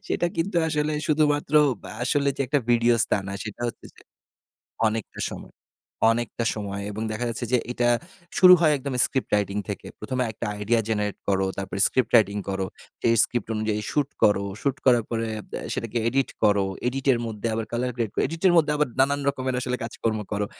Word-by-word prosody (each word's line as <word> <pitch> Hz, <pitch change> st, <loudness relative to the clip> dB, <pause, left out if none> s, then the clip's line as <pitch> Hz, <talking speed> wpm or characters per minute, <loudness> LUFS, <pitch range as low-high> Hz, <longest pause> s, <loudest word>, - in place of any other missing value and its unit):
সেটা 175 Hz, -, +1 dB
কিন্তু 175 Hz, +2 st, -1 dB
আসলে 150 Hz, 0 st, 0 dB
শুধুমাত্র 150 Hz, -1 st, +1 dB, 0.3 s
বা -, -, -9 dB
আসলে 140 Hz, +2 st, +1 dB
যে -, -, -7 dB
একটা 145 Hz, +3 st, +2 dB
videos, 120 Hz, -1 st, +4 dB
তা -, -, +3 dB
না। -, -, -4 dB
সেটা 110 Hz, +2 st, -7 dB
হচ্ছে -, -, -9 dB
যে -, -, -18 dB, 0.9 s
অনেকটা 110 Hz, -1 st, -4 dB
সময় -, -, -9 dB, 0.6 s
অনেকটা 115 Hz, 0 st, -2 dB
সময় 100 Hz, -2 st, -4 dB
এবং 110 Hz, +2 st, -4 dB
দেখা 110 Hz, +3 st, -3 dB
যাচ্ছে 115 Hz, +1 st, -4 dB
যে -, -, +6 dB
এটা 120 Hz, -1 st, +1 dB, 0.5 s
শুরু 180 Hz, -1 st, +9 dB
হয় 155 Hz, -3 st, +4 dB
একদম 135 Hz, 0 st, -5 dB
script 130 Hz, -, -2 dB
writing 105 Hz, 0 st, +1 dB
থেকে। -, -, -5 dB
১ম 130 Hz, -, -4 dB
এ -, -, -1 dB
একটা 115 Hz, -, -5 dB, 0.2 s
idea 115 Hz, +3 st, +2 dB
generate 105 Hz, -2 st, -1 dB
করো, 95 Hz, -1 st, +2 dB
তারপর 95 Hz, -1 st, -5 dB
script 125 Hz, -4 st, 0 dB
writing 105 Hz, -3 st, +4 dB
করো, 95 Hz, 0 st, -1 dB, 0.4 s
সেই 115 Hz, -, +3 dB
script 120 Hz, -3 st, -2 dB
অনুযায়ী 110 Hz, 0 st, -1 dB
shoot 145 Hz, -2 st, 0 dB
করো, 100 Hz, -1 st, +4 dB, 0.2 s
shoot 140 Hz, -1 st, 0 dB
করার 120 Hz, -3 st, +5 dB
পরে 115 Hz, -1 st, -1 dB
আব -, -, -10 dB, 0.3 s
সেটাকে 115 Hz, +1 st, -3 dB
edit 135 Hz, +2 st, 0 dB
করো, 100 Hz, -2 st, +4 dB, 0.2 s
edit 135 Hz, +2 st, -3 dB
এর 120 Hz, -, -1 dB
মধ্যে 110 Hz, 0 st, -4 dB
আবার 110 Hz, 0 st, -2 dB
colour 125 Hz, +1 st, -1 dB
grade 115 Hz, -4 st, -2 dB
edit 165 Hz, +2 st, -7 dB
এর 175 Hz, -, +4 dB
মধ্যে 150 Hz, -2 st, +4 dB
আবার 150 Hz, -2 st, +2 dB
নানান 140 Hz, +1 st, +3 dB
রকমের 130 Hz, -2 st, -2 dB
আসলে 125 Hz, 0 st, -2 dB
কাজকর্ম 115 Hz, -1 st, -2 dB
করো। 105 Hz, 0 st, 0 dB
120 Hz, 190 wpm, -25 LUFS, 105-135 Hz, 0.9 s, শুরু